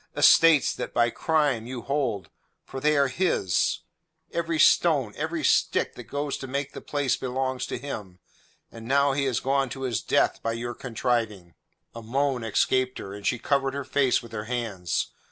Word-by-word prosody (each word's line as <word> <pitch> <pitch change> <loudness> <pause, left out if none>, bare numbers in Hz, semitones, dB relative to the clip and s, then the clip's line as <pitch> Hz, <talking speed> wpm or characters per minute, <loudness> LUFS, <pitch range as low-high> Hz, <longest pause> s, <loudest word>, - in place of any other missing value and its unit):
Estates 165 -3 +6
that - - -6
by 120 0 +3
crime 145 -8 0
you 125 -2 -6
hold 120 - -2 0.3
for 135 - -7
they 150 +2 +2
are 140 -1 +4
his; 130 - 0 0.5
every 170 -1 -1
stone, 145 -9 +4
every 160 +1 -3
stick - - +2
that - - -10
goes 145 0 -3
to 135 - -6
make 140 +2 -3
the - - -8
place 145 -3 0
belongs 130 0 -2
to - - -4
him, 105 -9 -7 0.5
and 115 0 -10
now 140 +1 +3
he 140 0 0
has 130 -4 0
gone 135 0 0
to 135 +2 -6
his 125 -4 -1
death - - +1
by 115 - -1
your 120 +1 -4
contriving." 115 -8 -2 0.4
A 115 - -8
moan 130 +2 -1
escaped 130 +3 +1
her, 100 - -7
and 100 0 -5
she 120 - +1
covered 135 +1 0
her 140 -1 -4
face 135 -3 +2
with 115 - -12
her 110 -1 -5
hands. 110 -8 -2
130 Hz, 180 wpm, -26 LUFS, 115-140 Hz, 0.5 s, Estates